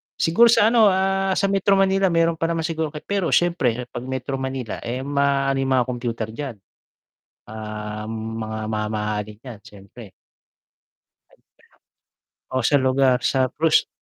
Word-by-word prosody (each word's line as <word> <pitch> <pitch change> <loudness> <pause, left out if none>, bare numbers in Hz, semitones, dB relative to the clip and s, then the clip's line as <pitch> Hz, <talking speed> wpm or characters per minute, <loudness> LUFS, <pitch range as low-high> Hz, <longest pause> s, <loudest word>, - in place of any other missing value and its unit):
Siguro 170 +9 +4
sa 215 -2 +5
ano, 225 -3 +6
ah, 195 0 +1
sa 200 - +1
Metro 195 0 +2
Manila 195 0 +3
meron 165 0 +2
pa 165 - 0
naman 165 -1 -1
siguro, 160 -2 -2 0.2
pero 200 -4 -1
siyempre 125 -9 +1
'pag 120 0 -6
Metro 130 +1 -3
Manila, 130 -3 -4
eh, 125 +2 -3
maano 140 -1 +1
'yung 135 0 -1
mga 125 -2 +2
kompyuter 120 -3 -4
diyan, 135 0 -6 1.0
ah, 105 0 -6
mga 110 0 -5
mamahalin 105 -1 -3
'yan, 125 -6 -9
siyempre. 100 +1 -14 2.4
Oh 130 - -1
sa 145 - +3
lugar 130 -1 +2
sa 130 -1 +2
prus 160 +4 +2
130 Hz, 135 wpm, -22 LUFS, 115-165 Hz, 2.4 s, ano